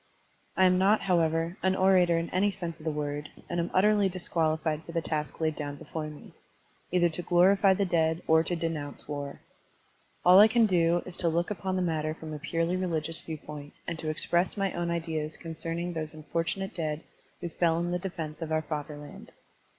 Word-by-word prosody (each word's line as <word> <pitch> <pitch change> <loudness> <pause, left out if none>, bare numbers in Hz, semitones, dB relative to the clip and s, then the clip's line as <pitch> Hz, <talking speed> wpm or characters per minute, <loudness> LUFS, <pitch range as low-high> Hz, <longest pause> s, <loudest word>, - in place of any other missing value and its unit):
I 190 - +6
am 180 0 +4
not, 200 +3 +4
however, 165 -1 +1
an 190 0 +2
orator 185 -3 +4
in 165 0 -2
any 195 +3 +2
sense 175 -4 -5
of 155 - -13
the - - +1
word, 150 -1 -3 0.2
and 175 - -2
am 170 - -1
utterly 205 +1 +4
disqualified 160 -3 -1
for 170 - -10
the 170 - +1
task 150 -1 -3
laid 155 -1 0
down 145 -1 -4
before 155 +2 -5
me, 150 -1 -11 0.6
either 175 -1 +4
to 170 - -5
glorify 190 +3 +4
the 200 - +1
dead 160 -2 +1
or 160 0 +5
to 175 - -1
denotmce 160 -3 -4
war. 145 -1 -5 0.8
All 180 +1 +8
that - - +11
I 215 - +9
can 230 0 +4
do 175 -3 +2
is 185 - -6
to 170 - +3
look 170 +4 0
upon 190 -2 -2
the 185 - +1
matter 155 -2 -1
from 160 -1 -8
a 150 - -5
purely 165 +4 -1
religious 165 -3 -1
viewpoint 150 -2 -8
and 170 -2 -3
to 155 - -3
express 175 +5 +1
my 195 -1 0
own 175 0 -2
ideas 160 -2 -3
concern 165 0 -3
ing 175 +1 -3
those 155 -1 -3
unf 155 -1 -11
ortimate 190 +4 -1
dead 155 -2 -3 0.4
who 175 - -3
fell 165 0 +1
in 175 +1 -1
the 180 - 0
defense 165 -4 -5
of 160 -1 -4
our 155 0 +1
fatherland. 150 -1 -7
165 Hz, 205 wpm, -29 LUFS, 155-180 Hz, 0.8 s, that